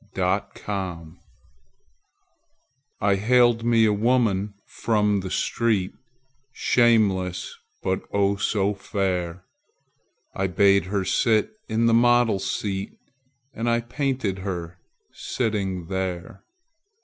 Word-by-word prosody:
My 95 +2 +1
Madonna 90 -5 -5 1.8
I 100 -1 +3
haled 120 +2 +3
me 115 -1 +4
a 105 - +3
woman 105 -3 +1
from 105 -3 0
the 95 0 -5
street, 105 -2 0 0.6
Shameless, 100 -9 +1 0.3
but, 95 0 -1
oh, 100 0 +2
so 100 0 0
fair! 95 -3 -3 0.9
I 95 -1 -1
bade 100 +2 +3
her 95 0 -2
sit 110 +2 +2 0.2
in 115 +1 +1
the 115 - +4
model's 115 -5 +3
seat 95 -1 -3 0.6
And 120 0 -2
I 120 0 +2
painted 125 -5 -2
her 90 -2 -5 0.3
sitting 100 -7 -3
there. 95 -1 -5
100 Hz, 100 wpm, -24 LUFS, 95-115 Hz, 1.8 s, me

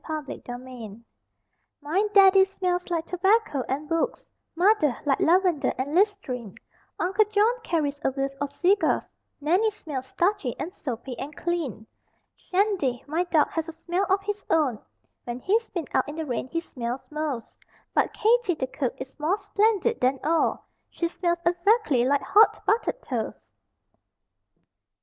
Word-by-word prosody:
_ 310 -2 -4
SMELLS - - -7
(JUNIOR) 245 -4 -8 0.8
My 315 +7 0
Daddy 390 -1 +7
smells 365 -2 -2
like 335 -2 -1
tobacco 380 - +1
and 285 +3 -2
books, 330 0 -1 0.3
Mother, 345 - +3
like 275 -2 +2
lavender 355 -3 +3
and 275 +3 -3
listerine; 325 - 0 0.4
Uncle 395 +4 +2
John 420 +3 +3
carries 295 -7 -1
a - - +3
whiff 270 +1 -2
of 285 0 -3
cigars, 385 +3 +2 0.4
Nannie 360 +9 +2
smells 295 -11 -6
starchy 345 - 0
and 360 - -4
soapy 250 - -5
and 295 +2 -6
clean. 325 - -3 0.5
Shandy, 365 - 0
my 325 +5 -1
dog, 320 -4 +3
has 325 0 -3
a - - -5
smell 350 +4 -2
of 390 +1 +2
his 415 0 -4
own 280 -9 +2 0.5
(When 240 0 -4
he's 440 - +1
been 345 -6 -4
out 265 - +1
in 295 - -6
the 320 0 -3
rain 250 -2 -3
he 330 +5 -2
smells 245 -5 -5
most); 300 -6 -4 0.3
But - - +2
Katie, 450 -4 +2
the 265 - -2
cook, 260 -1 -3
is 260 +3 -9
more 325 +7 +1
splendid 420 +2 +1
than 260 +1 +2
all 325 +2 +1 0.2
She 335 - -2
smells 345 0 0
exactly 350 - +3
like 280 +2 +2
hot 430 +2 +5
buttered 470 +2 0
toast! 235 -5 -4
330 Hz, 155 wpm, -26 LUFS, 270-390 Hz, 0.8 s, Daddy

